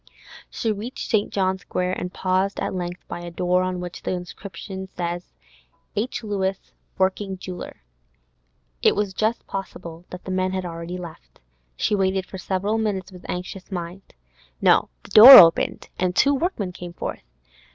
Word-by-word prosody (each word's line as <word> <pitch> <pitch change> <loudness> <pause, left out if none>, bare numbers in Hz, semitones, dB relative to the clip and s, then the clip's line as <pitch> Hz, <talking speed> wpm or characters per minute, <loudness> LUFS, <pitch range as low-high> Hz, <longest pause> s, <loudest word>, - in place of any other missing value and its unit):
She 225 - -2
reached 215 +5 -5
St. 210 -2 +1
John's 190 -1 0
Square, 180 0 -2
and 180 - -4
paused 185 +2 0
at - - -2
length 175 -1 -5
by - - -6
a 175 0 -7
door 180 +1 +1
on 185 -1 -2
which 180 -1 -6
was - - -24
the - - -2
inscription: 190 +1 -7 1.1
'H. 230 +4 -2
Lewis, 195 -2 -3 0.2
Working 190 +1 0
Jeweller.' 180 - -8 1.0
It - - +4
was 205 -2 -1
just 220 +4 -1
possible 175 -3 -7
that 180 - -10
the 190 - -4
men 185 0 0
had 185 -1 -2
already 170 +1 -6
left; 160 - -11 0.4
she 210 - 0
waited 190 -1 +1
for 190 - -9
several 200 +4 -1
minutes 195 -4 -2
with 180 -1 -13
anxious 180 +2 -6
mind. 180 +1 -7 0.4
No; - - +4
the - - -15
door 240 +6 +12
opened, 165 -2 +5
and 180 0 0
two 280 - +4
workmen 275 - -1
came 175 -1 -9
forth. - - -6
185 Hz, 160 wpm, -23 LUFS, 180-200 Hz, 1.1 s, door